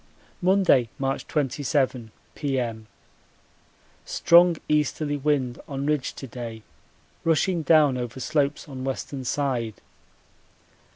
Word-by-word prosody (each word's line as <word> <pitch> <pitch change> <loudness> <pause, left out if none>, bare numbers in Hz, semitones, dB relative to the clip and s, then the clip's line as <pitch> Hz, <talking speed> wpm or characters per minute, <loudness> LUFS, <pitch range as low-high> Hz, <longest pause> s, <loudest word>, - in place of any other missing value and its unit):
Monday, 180 - +4
March 135 0 -2
27, 135 -4 0 0.2
P.M. 120 -6 -3 1.2
Strong 170 0 +5
easterly 150 0 0
wind 135 -4 0
on 140 0 -4
ridge 150 -2 -1
to - - -7
day 115 -3 -7 0.6
rushing 165 +2 +2
down 150 -5 +4
over 120 +1 -5
slopes 145 +1 0
on 130 -3 -7
western 135 0 -4
side. 125 -5 -1
140 Hz, 100 wpm, -25 LUFS, 125-150 Hz, 1.2 s, Strong